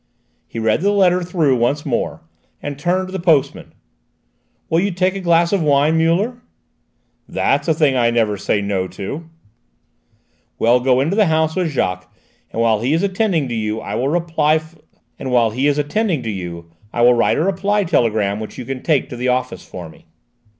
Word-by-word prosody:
He - - -10
read 110 +5 +1
the 200 - +2
letter 185 -3 +3
through 165 -7 +1
once 135 +5 0
more, 125 -5 -2 0.4
and 145 -1 -6
turned 185 +3 0
to - - -9
the 190 - -4
postman. 155 -5 +1 0.9
"Will 165 - +2
you 200 +3 +1
take 185 0 0
a - - -3
glass 170 0 +2
of 195 - +2
wine, 150 +1 +3
Muller?" 185 +10 +1 0.9
"That's - - 0
a 160 - +4
thing 150 -4 +2
I 120 -2 +3
never 115 -3 +1
say 100 +1 -1
'no' 100 -2 -1
to." 145 - -7 1.3
"Well, 120 +2 +3
go 130 0 +2
into 160 +8 0
the 210 -3 +4
house 160 0 +1
with 180 -3 0
Jacques, 90 - -2 0.4
and - - -5
while 110 -2 +2
he 130 +5 +1
is 165 +4 +1
attending 190 -6 0
to - - -3
you 110 -1 -2
I - - -6
will 130 - 0
write 160 -1 +1 2.8
a - - +1
reply 195 +3 +1
telegram 110 - +1
which 110 - -8
you 125 - -6
can 130 +1 -5
take 155 -5 +1
to - - -7
the 125 +1 -2
office 125 0 -1
for 90 -2 -9
me." 80 - -18
150 Hz, 165 wpm, -19 LUFS, 120-175 Hz, 2.8 s, a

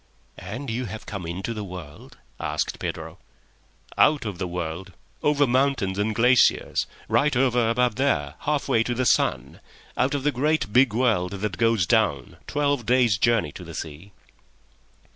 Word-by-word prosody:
"And 135 -1 -6
you 125 +3 -2
have 110 0 -8
come 95 -5 -6
into 95 +7 -4
the 105 -2 -5
world?" 90 -6 -10 0.2
asked - - -2
Pedro. - - -6 0.8
"Out 150 -4 +4
of 100 -5 -5
the 90 - -2
world. 90 +1 -5 0.3
Over 145 -1 +3
mountains 125 -7 +1
and 105 +1 0
glaciers; 125 +2 +3 0.2
right 150 -1 +2
over 125 -3 +2
above 120 -1 +1
there, 75 - 0
half 150 -1 -1
way 110 - +3
to 120 +1 -1
the 130 +1 0
sun. - - +1 0.4
Out 135 +3 +1
of 140 - -2
the 150 - +2
great, 145 -4 0
big 125 -3 +4
world 110 -7 +1
that 100 +1 -4
goes 115 -5 +3
down, - - +1
twelve 145 -5 0
days' 120 -5 +3
journey 115 -10 +2
to - - -10
the - - -9
sea." 80 +6 -8
115 Hz, 160 wpm, -24 LUFS, 95-130 Hz, 0.8 s, Out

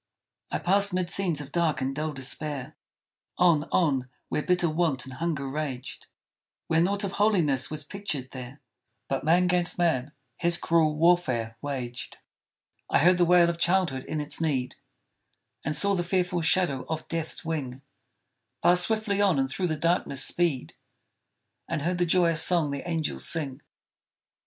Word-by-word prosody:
I - - -1
passed 200 +1 +2
'mid 180 -1 -1
scenes 175 -7 0
of 145 -1 -10
dark 170 -2 0
and 135 +1 -2
dull 155 +1 -2
despair, 140 0 -4 0.6
On, 165 -4 +4
on, 135 -7 +1 0.2
where - - -1
bitter 180 +1 +1
want 155 -5 0
and 130 - -9
hunger 150 -1 -3
raged; 135 -3 -5 0.6
Where 165 0 +2
naught 200 +4 +1
of 195 - -2
holiness 175 -11 +1
was 155 -1 -5
pictured 150 -7 -5
there, 130 +2 -9 0.5
But 135 -1 -2
man 170 +4 +3
'gainst 180 -1 +2
man 150 -6 +1 0.3
his 170 0 +2
cruel 160 -3 +2
warfare 150 -9 +2
waged! 130 -4 -5 0.7
I - - +3
heard 180 +4 +4
the 175 - +5
wail 175 0 +5
of 170 0 -2
childhood 170 -7 +1
in 155 - -3
its 150 +2 -3
need, 135 -6 -1 0.9
And 150 +1 -1
saw 200 +4 +5
the 175 -2 0
fearful 180 -1 0
shadow 160 -5 +1
of 160 -1 -4
Death's 165 +1 -5
wing 140 -5 -4 0.8
Pass 180 0 +6
swiftly 215 0 0
on 190 -7 +3
and 135 0 +1
through 180 +7 -2
the 155 -2 -2
darkness 165 -5 +1
speed, 165 -7 0 1.0
And 155 -3 -2
heard 175 +2 -1
the 175 - +2
joyous 165 -2 +3
song 170 -5 +2
the 140 +5 -5
angels 160 -2 -1
sing! 145 -4 -2
160 Hz, 160 wpm, -27 LUFS, 140-175 Hz, 1.0 s, Pass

